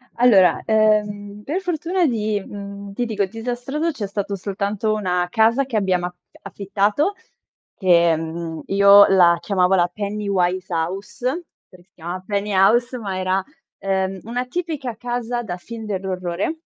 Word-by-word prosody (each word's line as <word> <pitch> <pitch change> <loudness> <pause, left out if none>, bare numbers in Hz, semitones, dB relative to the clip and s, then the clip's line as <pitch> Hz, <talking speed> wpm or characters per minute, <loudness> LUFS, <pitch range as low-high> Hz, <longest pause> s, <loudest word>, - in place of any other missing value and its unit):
Allora, 220 -7 +5
ehm, 210 -1 +1
per 350 +7 -2
fortuna 350 +1 0
di, 215 -6 0
mhmm, 200 0 -8
ti 240 +4 -1
dico, 210 -3 0
disastrato 245 - -3
c'è 225 -9 -5
stato 200 0 -3
soltanto 200 +2 -2
una 180 -4 0
casa 230 +6 +3
che 250 -4 -2
abbiamo 185 -3 +1
af 180 - -11 0.3
affittato 205 - 0 0.6
che, 170 -3 +4
mhmm, 165 0 -5
io 200 +1 +7
la 175 -3 +5
chiamavo 190 -2 +2
la 175 -1 +3
Pennywise 190 -3 -1
House, 190 +9 -4 0.4
perché 180 -2 -18
si 195 - -46
chiama 175 +2 -6
Penny 205 0 -2
House, 235 +6 +3
ma 195 -5 -4
era, 185 +1 0 0.3
ehm, 190 -1 -1
una 245 +3 -3
tipica 295 -5 -4
casa 240 0 -3
da 180 -5 -5
film 225 +4 -9
dell'orrore. 190 - -3
200 Hz, 145 wpm, -21 LUFS, 185-230 Hz, 0.6 s, io